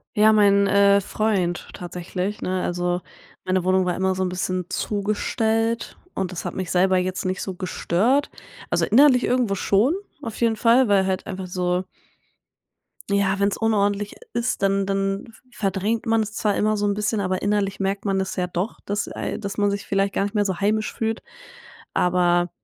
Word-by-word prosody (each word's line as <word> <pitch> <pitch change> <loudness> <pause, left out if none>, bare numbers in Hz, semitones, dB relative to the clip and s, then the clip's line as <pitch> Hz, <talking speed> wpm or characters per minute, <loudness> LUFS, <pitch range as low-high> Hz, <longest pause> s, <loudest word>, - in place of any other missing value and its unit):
Ja, 215 0 +6
mein, 200 -1 +5
äh, 200 0 +5
Freund 195 -4 -1
tatsächlich, 180 +3 -5
ne? 185 0 -1
Also, 175 0 -1 0.4
meine 185 -1 +1
Wohnung 185 0 +2
war 180 - 0
immer 190 0 0
so 185 - -1
'n 185 - 0
bisschen 180 0 -2
zugestellt, 220 +2 -1 0.2
und 190 -1 -2
das 180 - -6
hat - - -4
mich 185 -2 -3
selber 185 +1 +3
jetzt 185 +1 -2
nicht 185 0 -1
so 190 - -4
gestört. 195 - 0 0.4
Also, - - +2
innerlich 255 +2 +5
irgendwo 245 -5 +1
schon 210 - +2 0.3
auf 230 -3 -5
jeden 230 -1 +3
Fall, 235 +2 +4
weil 195 -2 +3
halt 190 -1 -2
einfach 190 -1 -5
so 180 0 -1 1.3
ja, 195 -1 +1
wenn's 200 0 +1
unordentlich 205 -2 0 0.2
ist, 235 -3 -1
dann 195 0 +2
dann 195 +1 -1
v - - -29 0.3
verdrängt 200 +3 0
man 225 -1 +2
es 215 0 -4
zwar 210 -3 0
immer 215 0 +1
so 205 - 0
'n 205 - +2
bisschen, 210 +1 -1
aber 185 -1 -1
innerlich 205 -1 0
merkt 195 +1 -2
man 195 -1 +1
das 190 - -3
ja 180 -1 0
doch, 180 +5 -3
dass, 205 +1 -2
äh, - - -4
dass 200 -1 -5
man 205 -1 +2
sich 200 0 -4
vielleicht 195 0 +1
gar - - +1
nicht 205 +2 -4
mehr 205 -1 +2
so 185 -3 -2
heimisch 215 +2 0
fühlt. 225 0 -2 0.7
Aber, 175 -1 +2
200 Hz, 185 wpm, -23 LUFS, 185-215 Hz, 1.3 s, Ja